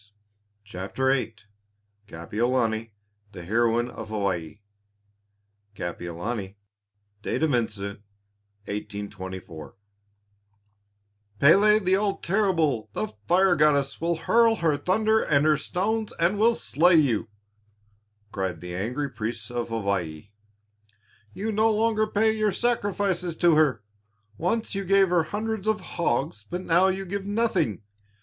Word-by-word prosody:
] 105 0 -47
CHAPTER 105 +7 -2
VIII 125 -4 -2 0.7
KAPIOLANI, 115 +5 -1 0.4
THE 90 - -8
HEROINE 120 +4 +1
OF - - -8
HAWAII 100 -4 -3 1.1
Kapiolani 95 +4 -5 0.6
(Date 155 - -2
of 155 -3 +2
Incident, 105 -4 -2 0.6
1824) 100 -5 -7 1.6
"Pélé 205 +7 +5
the 185 +1 +4
all 200 0 0
terrible, 165 - 0
the 110 - -2 0.2
fire 185 +1 +4
goddess, 140 -2 +2
will 170 +1 +1
hurl 230 +7 +3
her 165 -7 +1
thunder 215 +8 +2
and 145 0 +2
her 155 -1 +5
stones, 210 +9 -2
and 175 +5 +2
will 230 +2 +4
slay 170 +1 +3
you," 130 -9 +2 1.0
cried 95 -4 -3
the 90 +1 -7
angry 120 +10 -2
priests 110 -2 -5
of 120 -1 -3
Hawaii. 100 -6 -3 1.0
"You 215 - -3
no 220 +1 +3
longer 215 0 +1
pay 220 +1 +2
your 215 -1 +1
sacrifices 195 -6 -1
to 170 0 +4
her. 150 -8 +2 0.5
Once 200 - -1
you 195 0 -2
gave 195 0 +4
her 175 -2 +2
hundreds 215 +3 -3
of 220 -1 +2
hogs, 145 - -2
but 180 - -3
now 175 +1 +3
you 190 0 -1
give 195 +1 -4
nothing. 190 - 0
150 Hz, 120 wpm, -25 LUFS, -, 1.6 s, Pélé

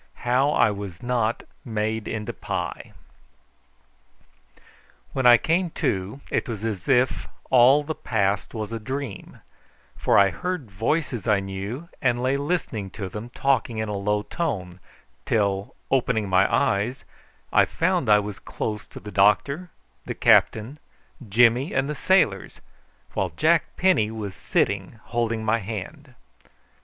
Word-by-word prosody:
HOW 130 +4 +3
I 110 - +4
WAS 100 -3 -7
NOT 120 -2 0 0.2
MADE 110 -3 -2
INTO 105 -2 -4
PIE. - - -5 2.2
When 130 -2 +2
I 120 0 +9
came 170 +7 0
to, 100 +8 -2
it - - -1
was 110 -3 -5
as 105 -5 -3
if 125 -1 +2 0.2
all 130 +4 +6
the 160 +2 -3
past 100 -5 -1
was 110 -1 -4
a 115 - -3
dream, 130 -1 -6 0.5
for - - +2
I 100 -1 +5
heard 180 - -4
voices 120 - -1
I 105 -3 +4
knew, 100 - -5
and 120 -1 +1
lay 130 +2 +2
listening 140 - -2
to 95 -3 -4
them 105 +5 -7
talking 130 -3 0
in 110 -1 -2
a 105 - -2
low 105 +1 0
tone, 95 - -4 0.4
till, 100 -2 0 0.2
opening 125 -5 +1
my 95 +1 +3
eyes, 105 +7 +1 0.5
I - - +6
found - - 0
I 105 - +7
was 105 -1 -4
close 105 -1 -5
to - - -11
the 105 - -9
doctor, 140 - +2 0.4
the - - -3
captain, 115 +7 +3 0.5
Jimmy, 120 - +3
and 135 +1 +1
the 150 - -2
sailors, 145 - +1 0.5
while 95 - -1
Jack 165 -1 +2
Penny 180 - +3
was 110 -3 -5
sitting 100 +3 -1
holding 115 -2 -2
my 115 +1 +2
hand. 115 +7 -7
110 Hz, 140 wpm, -24 LUFS, 100-130 Hz, 2.2 s, I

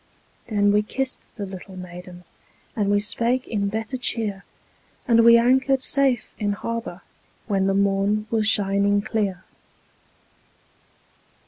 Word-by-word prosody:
Then 205 -3 +2
we 210 +1 +3
kissed 260 +5 -4
the 205 - -5
little 190 0 -10
maiden, 180 0 -10 0.5
And 205 -3 0
we 205 0 +3
spake 235 +5 -1
in 200 -3 -1
better 220 +5 -3
cheer, 215 -5 -2 0.6
And 230 -2 +5
we 235 0 +8
anchored 260 +2 +2
safe 270 -4 +1
in 205 -1 0
harbor 225 -4 -5 0.4
When 195 -3 0
the 195 - +1
morn 200 +2 +1
was 220 -2 +1
shining 200 -1 +2
clear. 205 -4 -2
210 Hz, 125 wpm, -23 LUFS, 195-230 Hz, 0.6 s, we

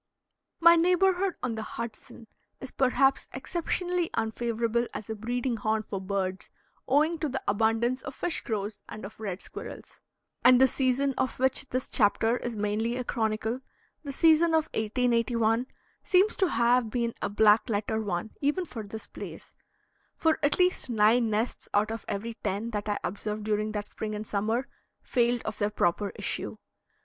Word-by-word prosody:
My 335 0 +8
neighborhood 365 +2 +3
on 250 -2 -1
the 220 - -4
Hudson 230 +1 -7 0.3
is 265 - -8
perhaps 270 +1 +2
exceptionally 350 +4 -1
unfavorable 230 +1 0
as 215 +1 -5
a - - -3
breeding 240 +3 -2
haunt 215 +1 0
for 195 -2 -4
birds, 190 -1 -3 0.4
owing 310 +4 +3
to 310 - -1
the 265 +1 -4
abundance 225 +5 +1
of 270 - -7
fish 350 - -1
crows 210 -1 -3
and 215 - -7
of 205 - -11
red 195 -4 -5
squirrels; - - -10 0.4
and 250 0 +7
the 265 - +8
season 265 +1 +1
of 260 - -1
which 265 +1 +1
this 255 +1 -2
chapter 225 +2 +2
is 240 -1 -4
mainly 210 +3 -1
a 255 - -2
chronicle, 220 +1 -1 0.4
the 285 - -5
season 320 +3 +4
of 315 -1 +1
1881, 230 +1 +1 0.4
seems 385 +3 +3
to 380 - +2
have 240 -2 +3
been 235 0 -1
a - - -1
black 210 +2 +4
letter 220 +1 -1
one 200 0 -3
even 295 +6 +1
for 235 -8 -7
this 215 +1 -8
place, - - -10 0.6
for 320 -1 +2
at 290 -1 +2
least 360 -6 +2
nine 225 +1 +4
nests 220 +3 -2
out 210 +2 +2
of 225 - -5
every 230 +4 -3
ten 210 +5 -2
that 210 -1 -3
I 205 - 0
observed 210 +3 -4
during 215 0 0
that 205 -1 -4
spring 215 -1 -4
and 210 +1 -5
summer 220 +6 -1 0.4
failed 240 -1 +1
of 215 - -5
their 205 - +1
proper 200 0 0
issue. - - -4
230 Hz, 165 wpm, -28 LUFS, 215-265 Hz, 0.6 s, My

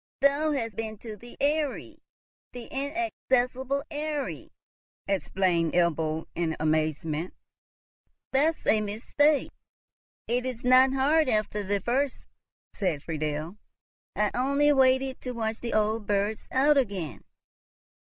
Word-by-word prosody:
"Thou 285 +3 +3
hast 230 -7 -3
been 220 0 -4
to 220 0 -8
the 240 +4 -14
Eyrie—the 285 -4 -4
inaccessible 275 -3 -1
Eyrie!" 295 -1 -4 0.6
exclaimed 185 -4 +1
Ebbo, 160 -2 +1
in 165 -2 -1
amazement. 155 +1 -1 1.0
"That's 305 +4 +1
a 215 - +4
mistake. 260 +8 +1 0.8
It 245 +2 0
is 255 -2 -5
not 255 +1 +6
hard 285 +2 +3
after 215 -1 0
the 200 0 -1
first" 260 +5 0 0.5
said 170 -8 -1
Friedel. 155 +3 -3 0.6
"I 210 -1 +1
only 280 +3 +3
waited 265 0 +3
to 250 - -4
watch 225 -1 -2
the 235 - -3
old 215 0 +1
birds 205 +1 -1
out 285 +3 +4
again." 190 - -2
235 Hz, 110 wpm, -27 LUFS, 190-275 Hz, 1.0 s, not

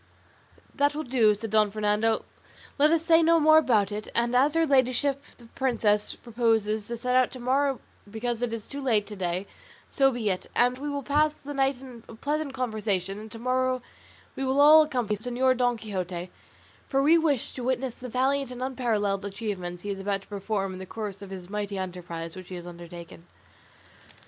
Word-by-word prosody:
"That 285 +1 +1
will 310 - -2
do," 235 -5 +3
said 220 +1 -6
Don 215 -1 +4
Fernando; 215 +2 0 0.5
"let 295 +2 +6
us 330 0 +2
say 330 0 +6
no 330 0 +5
more 310 0 +7
about 215 -9 +2
it; 210 +1 -5
and 235 +1 +1
as 285 +5 +4
her 330 0 +4
ladyship 275 0 +2 0.2
the 240 - -16
princess 225 -4 0
proposes 220 -3 0
to 235 - -4
set 250 +2 -1
out 255 -1 +4
to 255 - -8
morrow 270 +2 +1 0.3
because 230 +2 -3
it 245 -2 -1
is 230 -2 -5
too 285 0 -6
late 225 -6 +2
to 210 - -8
day, 180 0 -2 0.5
so 270 -1 +4
be 230 -5 -1
it, 185 - -4
and 250 +1 +3
we 295 +1 -4
will 285 -1 -3
pass 300 +2 +2
the 290 - -5
night 270 -2 +1
in 250 -3 -11 0.2
pleasant 295 +3 -2
conversation, 210 -6 -2
and 215 0 -10
to 225 - -9
morrow 255 +1 0 0.5
we 270 - -3
will 265 +1 +1
all 305 +2 +9
accompany 245 -9 -1
Señor 250 +3 +1
Don 245 -1 +1
Quixote; 185 -4 -5 0.6
for 270 0 +1
we 325 +4 +6
wish 295 -7 0
to 250 - -6
witness 260 0 -1
the 250 +1 -9
valiant 265 +3 +1
and 250 0 -6
unparalleled 220 -7 -1
achievements 195 -4 -5
he 205 - -3
is 195 - -5
about 195 0 -2
to - - -22
perform 200 -1 -3
in 185 - -8
the 190 - -8
course 205 -2 -6
of 200 - -9
this 185 -2 -8
mighty 205 0 -4
enterprise 175 -3 -6
which 185 -1 -10
he 185 - -6
has 175 -1 -8
undertaken." 170 0 -11
235 Hz, 200 wpm, -27 LUFS, 205-265 Hz, 0.6 s, all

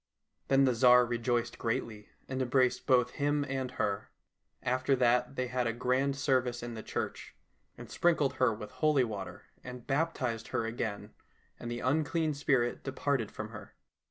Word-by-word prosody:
Then 135 0 +4
the 130 - +3
Tsar 125 +1 +6
rejoiced 120 0 -1
greatly, 110 -2 -3 0.2
and 130 0 -3
embraced 130 0 +1
both 125 -2 +4
him 145 0 0
and 135 -1 -2
her. 100 -5 -2 0.5
After 130 +2 +1
that 125 +1 +2
they 130 - -1
had 125 -1 -1
a 115 - 0
grand 130 +3 0
service 130 -4 0
in 120 0 -5
the 110 - -6
church, - - -5 0.4
and - - -9
sprinkled 160 -5 +2
her 130 - +3
with 105 -1 -7
holy 150 -4 +2
water, 105 -5 -6 0.2
and 125 -1 -9
baptized 135 -6 -1
her 115 - -1
again, 115 -2 -4 0.5
and 120 - -6
the 120 0 -4
unclean 155 +3 +1
spirit 135 -4 0
departed 135 -4 -1
from 110 0 -7
her. 105 -2 -11
125 Hz, 160 wpm, -31 LUFS, 120-135 Hz, 0.5 s, Tsar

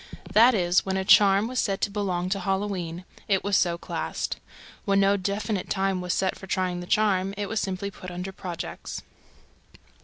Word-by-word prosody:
That 235 +3 +7
is, 180 -2 +3
when 190 0 -1
a 190 - -1
charm 200 +2 +6
was 255 +1 -2
said 195 -2 0
to 205 - 0
belong 185 -3 -1
to 195 +1 0
Halloween, 185 -2 -2 0.2
it 195 -2 +2
was 200 -1 +1
so 170 -2 +2
classed. - - -3 0.5
When 195 -1 +2
no 195 0 +4
definite 200 +1 -2
time 190 -1 0
was 180 0 -2
set 190 -1 0
for 190 - -11
trying 185 -1 -1
the 175 - -7
charm, 195 -2 +2
it 205 -1 -2
was 220 +1 -1
simply 195 0 -3
put 185 -2 -9
under 180 +2 -5
"projects." 180 -3 -6
195 Hz, 185 wpm, -26 LUFS, 185-200 Hz, 0.5 s, That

